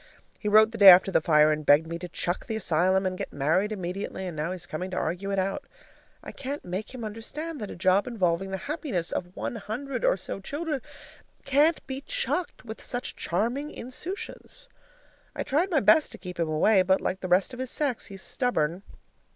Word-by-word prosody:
He 210 - -4
wrote 215 +1 +6
the 230 - -7
day 200 - +8
after 185 +1 +8
the - - +3
fire 155 -2 +5
and 155 0 -1
begged 145 +2 +5
me 170 +1 -5
to 180 0 -7
"chuck 175 +2 -3
the 225 - -2
asylum" 185 -1 +2
and 185 0 -2
get - - -4
married 160 +9 +1
immediately, 190 0 -4
and 175 -3 -5
now 155 +3 -2
he's 185 -2 -5
coming 180 +4 -5
to 185 - -5
argue 180 +5 -2
it 195 - -1
out. 195 +1 -1 0.6
I - - -7
can't 280 +2 -6
make 185 +4 -4
him 240 - -6
understand 255 +8 -6
that 210 - -5
a - - -7
job 185 +5 +2
involving 190 -5 0
the 190 - -3
happiness 280 - -3
of 180 0 -4
one 235 - -4
hundred 245 +5 -5
or - - +3
so 195 - -6
children 290 - -3 0.6
can't 295 +4 +3
be 265 0 -5
chucked 370 - -2
with 220 -1 -8
such 245 0 -3
charming 240 - -1
insouciance. 370 - -7 0.7
I - - -2
tried 320 +8 +1
my 310 -7 +2
best 315 -2 +5
to - - -8
keep 180 -2 -9
him 165 -2 0
away, 185 +6 +4
but, 190 +1 +3
like 190 - -2
the 185 - -4
rest 185 +7 +2
of 250 - -8
his 260 -1 -2
sex, 275 -5 -1
he's 195 -1 -9
stubborn. 180 - -1
195 Hz, 210 wpm, -27 LUFS, 180-260 Hz, 0.7 s, day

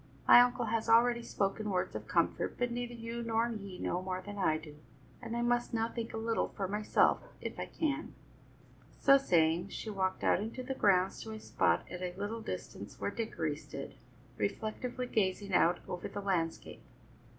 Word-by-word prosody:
My 245 - +10
uncle 245 0 +2
has 225 0 -1
already 235 +1 +5
spoken 210 -1 -1
words 185 -2 -1
of - - -5
comfort, - - +1
but 245 -1 0
neither 240 0 -3
you 230 0 -5
nor 230 0 +1
he 200 -5 -6
know 180 - -1
more 185 0 -3
than 205 +2 -8
I 160 -5 +3
do, 155 -2 -11 0.4
and 235 -1 -4
I 240 - 0
must 240 0 +1
now 225 0 +1
think 230 -1 -5
a - - -5
little 225 0 0
for 195 -2 -1
myself, 210 +2 +2 0.2
if - - -6
I - - -3
can." 305 -1 -2 0.8
So 275 0 +7
saying, 170 -6 +2
she 215 - -5
walked 190 -2 -1
out - - +4
into 225 +5 -4
the 265 - -3
grounds 190 -6 +2
to 220 - -6
a 220 - -7
spot 85 - +1
at 180 - -7
a 180 0 -4
little 210 +3 -3
distance 220 - -7
where - - -1
Dickory 165 -10 -2
stood, 145 -2 -8 0.5
reflectively 225 - -2
gazing 200 -3 0
out 175 0 +4
over 180 - -4
the 205 - -6
landscape. 175 -5 -2
215 Hz, 185 wpm, -33 LUFS, 185-235 Hz, 0.8 s, My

